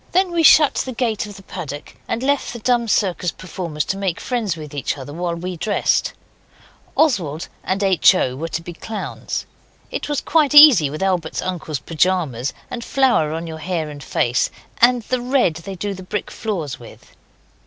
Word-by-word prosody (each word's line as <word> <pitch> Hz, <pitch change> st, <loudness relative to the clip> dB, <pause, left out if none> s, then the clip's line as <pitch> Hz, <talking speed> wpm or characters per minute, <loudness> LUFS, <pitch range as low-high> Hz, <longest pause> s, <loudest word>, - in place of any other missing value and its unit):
Then 370 Hz, 0 st, +3 dB
we 340 Hz, -1 st, +1 dB
shut 305 Hz, -1 st, +7 dB
the 260 Hz, -, -3 dB
gate 230 Hz, -2 st, -1 dB
of 205 Hz, -, -10 dB
the 195 Hz, -, -13 dB
paddock, 150 Hz, -7 st, -7 dB
and 235 Hz, -, -2 dB
left 280 Hz, -1 st, 0 dB
the -, -, -6 dB
dumb 235 Hz, 0 st, +1 dB
circus 185 Hz, -3 st, +1 dB
performers 170 Hz, -5 st, -5 dB
to 195 Hz, -, -2 dB
make 190 Hz, -4 st, -2 dB
friends 225 Hz, -9 st, -2 dB
with 150 Hz, -2 st, -9 dB
each 140 Hz, -1 st, -2 dB
other 140 Hz, +1 st, -8 dB
while 170 Hz, +1 st, -2 dB
we 180 Hz, +2 st, -5 dB
dressed. 205 Hz, +5 st, +1 dB, 0.8 s
Oswald 175 Hz, -, +1 dB, 0.2 s
and 195 Hz, +2 st, -1 dB
H. 190 Hz, 0 st, +5 dB
O. 130 Hz, -7 st, 0 dB
were 160 Hz, +5 st, -4 dB
to 165 Hz, 0 st, -4 dB
be 175 Hz, -, -7 dB
clowns. 215 Hz, +5 st, -5 dB, 0.5 s
It -, -, -4 dB
is 290 Hz, -, 0 dB
quite 300 Hz, -2 st, +2 dB
easy 275 Hz, -, +9 dB
with 155 Hz, +6 st, -4 dB
Albert's 180 Hz, -4 st, -1 dB
uncle's 170 Hz, -5 st, -3 dB
pyjamas, 155 Hz, -4 st, 0 dB, 0.2 s
and 235 Hz, -, -5 dB
flour 245 Hz, -, +2 dB
on 165 Hz, +1 st, -4 dB
your 160 Hz, -1 st, -7 dB
hair 165 Hz, -3 st, -3 dB
and 145 Hz, -1 st, -9 dB
face, 120 Hz, -2 st, +1 dB, 0.3 s
and 245 Hz, 0 st, +4 dB
the 255 Hz, +2 st, -1 dB
red 245 Hz, -, +1 dB
they 190 Hz, +3 st, -7 dB
do 200 Hz, +3 st, -3 dB
the 190 Hz, -, -9 dB
brick 185 Hz, +3 st, -4 dB
floors 165 Hz, -, -4 dB
with. 120 Hz, -, -15 dB
185 Hz, 185 wpm, -20 LUFS, 160-235 Hz, 0.8 s, easy